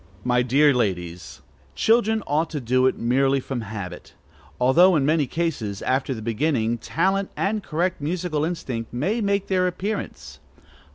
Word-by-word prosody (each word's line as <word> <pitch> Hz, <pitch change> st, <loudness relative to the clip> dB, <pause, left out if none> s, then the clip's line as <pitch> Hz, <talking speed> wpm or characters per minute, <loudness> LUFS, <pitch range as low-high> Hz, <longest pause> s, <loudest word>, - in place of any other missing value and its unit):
My 125 Hz, 0 st, +2 dB
dear 140 Hz, +4 st, +4 dB
ladies, 90 Hz, -7 st, -3 dB, 0.3 s
children 220 Hz, -1 st, +2 dB
ought 155 Hz, +3 st, 0 dB
to 150 Hz, -, -4 dB
do 130 Hz, +1 st, +2 dB
it -, -, 0 dB
merely 135 Hz, +3 st, +2 dB
from 130 Hz, -2 st, -4 dB
habit, 100 Hz, -5 st, -8 dB, 0.4 s
although 170 Hz, +9 st, +5 dB
in 140 Hz, -3 st, +2 dB
many 150 Hz, -1 st, +2 dB
cases, 125 Hz, -12 st, -3 dB
after 130 Hz, 0 st, 0 dB
the 110 Hz, -, -7 dB
beginning, 115 Hz, -1 st, 0 dB
talent 190 Hz, -, 0 dB
and 210 Hz, +2 st, 0 dB
correct 170 Hz, -1 st, -2 dB
musical 165 Hz, 0 st, -2 dB
instinct 130 Hz, -9 st, -4 dB
may 190 Hz, -, -1 dB
make 200 Hz, -1 st, 0 dB
their 185 Hz, -1 st, +1 dB
appearance. 190 Hz, +4 st, -5 dB
145 Hz, 150 wpm, -23 LUFS, 120-180 Hz, 0.4 s, although